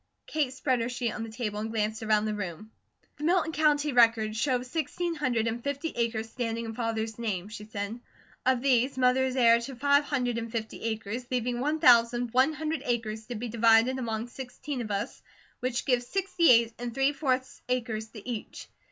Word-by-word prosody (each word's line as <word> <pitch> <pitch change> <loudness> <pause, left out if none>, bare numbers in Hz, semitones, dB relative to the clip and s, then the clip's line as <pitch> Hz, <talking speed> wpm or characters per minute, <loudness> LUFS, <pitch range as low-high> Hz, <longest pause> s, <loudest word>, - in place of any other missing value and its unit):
Kate 300 -4 -1
spread 260 -1 0
her 230 - -1
sheet 245 -2 -2
on - - -5
the 225 - -5
table 220 -2 -4
and 220 +1 -3
glanced 220 0 -1
around 215 -1 +2
the 215 - -1
room: 205 +1 -6 0.5
"The - - -7
Milton 340 0 +2
County 300 -1 +2
records 230 -3 +4
show 250 +1 +1
sixteen 330 +5 -2
hundred 255 -7 0
and 230 +1 -2
fifty 280 +3 -2
acres 230 -2 -1
standing 230 -1 -3
in 225 - -5
Father's 225 -1 -3
name," 205 -4 -3
she 215 -1 -8
said. 210 +2 -5 0.4
"Of 255 -1 +2
these, 260 0 +2
Mother 255 0 +3
is 260 0 -2
heir 235 -2 +6
to 260 +3 -7
five 285 +3 +3
hundred 245 -5 -1
and 230 0 -6
fifty 220 -2 -4
acres, 225 +2 -3
leaving 245 -1 -1
one 300 +4 0
thousand 240 -3 +5
one 260 +5 +4
hundred 315 +1 -3
acres 220 -2 -2
to 245 - -5
be 235 +3 -4
divided 230 +3 +4
among 225 -2 -2
sixteen 265 +2 -6
of 220 - -5
us, 205 +5 -3 0.4
which 250 -1 -2
give 250 -3 +3
sixty 355 +5 +1
eight 230 -2 +5
and 240 -1 -5
three 270 +1 +2
fourths 260 -3 -1
acres 225 -3 -1
to 220 -1 -12
each. 235 -4 -6
240 Hz, 195 wpm, -28 LUFS, 225-260 Hz, 0.5 s, heir